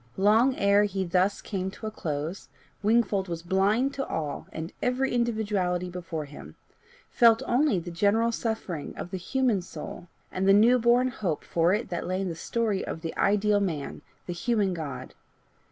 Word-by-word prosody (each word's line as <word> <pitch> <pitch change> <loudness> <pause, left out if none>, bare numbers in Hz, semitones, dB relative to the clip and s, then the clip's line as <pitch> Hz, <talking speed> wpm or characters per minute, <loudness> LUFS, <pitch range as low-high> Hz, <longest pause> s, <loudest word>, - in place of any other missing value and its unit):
Long 220 +7 +4
ere 200 0 +4
he 195 -1 -2
thus 185 +3 +1
came 190 -2 -3
to 205 - -10
a 215 - -3
close, 160 -1 -4 0.3
Wingfold 210 -3 +2
was 170 -1 -5
blind 205 +9 +2
to 270 -1 -3
all 150 -3 -4
and 160 +2 -6
every 255 +1 0
individuality 205 -7 0
before 170 -3 -5
him 145 0 -12 0.6
felt 230 -1 +5
only 250 -3 +2
the 175 0 -5
general 210 +6 +2
suffering 220 -9 -4
of 175 - -6
the 190 - -3
human 235 +2 0
soul, 175 0 -8 0.2
and 190 +1 -1
the 195 - +7
new 235 +5 +6
born 240 +2 +4
hope 190 - -3
for 170 +3 +2
it 220 - -4
that 175 - -3
lay 185 +1 -1
in 195 -1 -2
the 165 - -4
story 215 +2 -1
of 160 - -5
the 165 -1 -5
ideal 205 +1 +2
man, 165 -8 -3 0.2
the 175 - -4
human 205 +1 0
God. 140 -6 -6
195 Hz, 175 wpm, -27 LUFS, 175-225 Hz, 0.6 s, the